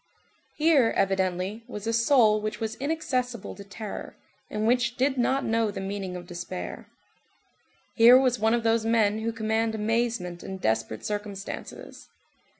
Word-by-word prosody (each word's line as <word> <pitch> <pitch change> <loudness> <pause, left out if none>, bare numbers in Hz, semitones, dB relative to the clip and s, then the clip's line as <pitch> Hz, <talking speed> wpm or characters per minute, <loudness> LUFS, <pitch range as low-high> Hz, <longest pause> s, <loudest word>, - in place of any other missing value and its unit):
Here, 300 -7 +3
evidently, 190 +2 0
was 210 0 -7
a 230 - 0
soul 230 -3 +4
which 215 +2 -4
was 225 -1 -2
inaccessible 255 - -2
to 200 - -10
terror, 200 +1 -7 0.3
and 215 0 -2
which 245 +1 +2
did 265 +1 +2
not 265 +2 +1
know 225 -1 +1
the 200 -1 -5
meaning 195 -1 -4
of 175 -1 -7
despair. 175 +1 -7 1.1
Here 240 +2 +8
was 255 -2 +1
one 220 +2 +3
of 235 - -2
those 225 0 +2
men 220 -2 +2
who 225 +1 -1
command 220 0 -1
amazement 220 -5 -1
in 190 - -6
desperate 110 -8 -1
circumstances. 205 -1 -6
220 Hz, 150 wpm, -26 LUFS, 200-235 Hz, 1.1 s, Here